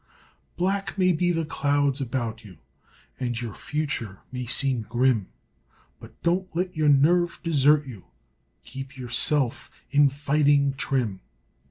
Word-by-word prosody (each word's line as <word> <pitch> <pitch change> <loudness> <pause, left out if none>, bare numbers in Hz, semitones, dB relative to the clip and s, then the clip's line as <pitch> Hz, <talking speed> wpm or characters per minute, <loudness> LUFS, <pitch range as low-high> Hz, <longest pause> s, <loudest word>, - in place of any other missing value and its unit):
Black 195 +3 -1
may 185 -1 +4
be 175 +1 +1
the 165 -2 -1
clouds 145 -2 0
about 120 -4 -3
you 95 -6 -13 0.6
And 120 -3 -2
your 115 -4 -5
future 145 -11 -3
may 125 -1 -5
seem 135 -1 +2
grim, 120 -2 +1 0.7
But - - -15
don't 185 +2 +1
let 180 +1 -2
your 155 -1 +2
nerve 170 +5 +3
desert 150 -2 +3
you; 110 -9 -10 0.6
Keep 135 0 -8
yourself 125 +1 0 0.2
in 145 0 +5
fighting 145 0 +2
trim. 125 -8 -2
140 Hz, 130 wpm, -25 LUFS, 125-155 Hz, 0.7 s, in